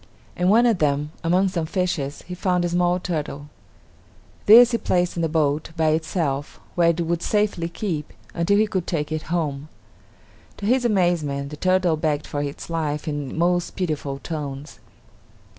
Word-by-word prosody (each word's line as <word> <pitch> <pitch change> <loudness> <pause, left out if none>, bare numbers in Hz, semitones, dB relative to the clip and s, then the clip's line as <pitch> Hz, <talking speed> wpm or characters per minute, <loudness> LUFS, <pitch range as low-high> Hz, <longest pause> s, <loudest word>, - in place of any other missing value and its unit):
In 180 +1 +1
one 230 +4 +5
of 225 -6 +3
them, 150 0 0
among 180 +3 +3
some 170 -3 -2
fishes, 160 -6 -2
he 180 - -8
found 180 -1 0
a - - 0
small 175 +1 +2
turtle. 150 -5 -4 1.0
This 235 +3 +9
he 235 - 0
placed 180 -1 0
in 170 - -2
the 165 - 0
boat, 150 -1 0
by 160 -1 +3
itself, 155 -3 -1
where 170 -1 +3
it 170 +1 0
would 170 0 -1
safely 205 -5 0
keep, 170 -5 -4 0.2
until 180 +4 +2
he 215 - +4
could 185 -4 -3
take 155 -3 -2
it 155 0 -1
home. 155 -4 -2 0.9
To 200 - -6
his 245 +3 +2
amazement, 165 -9 +1
the - - -5
turtle 185 0 +2
begged 150 -1 -1
for 145 - -3
its 145 0 -5
life 155 -3 -2
in 145 -1 -4
most 175 +1 +1
pitiful 150 -6 -2
tones. 145 -1 -6
165 Hz, 170 wpm, -23 LUFS, 150-180 Hz, 1.0 s, This